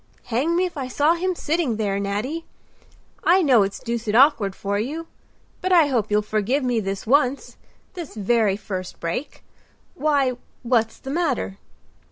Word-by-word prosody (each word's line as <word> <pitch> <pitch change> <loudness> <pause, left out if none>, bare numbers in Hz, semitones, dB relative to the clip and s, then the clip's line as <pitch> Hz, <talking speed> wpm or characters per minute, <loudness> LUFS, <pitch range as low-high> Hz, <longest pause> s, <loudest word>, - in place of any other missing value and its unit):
"Hang 295 +9 +1
me 365 +1 +2
if 350 -3 -6
I 265 -2 -3
saw 295 +5 +2
him 365 +2 -1
sitting 315 -7 0
there, 200 -2 -1
Nattie! 215 +12 -3 0.8
I 370 +1 +5
know 255 -7 +5
it's 195 0 -1
deuced 230 -2 -3
awkward 240 -7 +4
for 200 +1 -2
you. 300 +9 -3 0.6
But 370 - -1
I 330 -5 +6
hope 230 -6 0
you'll 210 0 +2
forgive 215 +7 0
me 245 -2 +1
this 195 -2 -4
once—this 280 - -2
very 210 -1 +2
first 190 -3 -6
break. 170 - -4 0.5
Why, 285 -6 +1 0.3
what's 230 -2 +1
the 270 - -7
matter?" 280 - -1
250 Hz, 155 wpm, -23 LUFS, 210-300 Hz, 0.8 s, I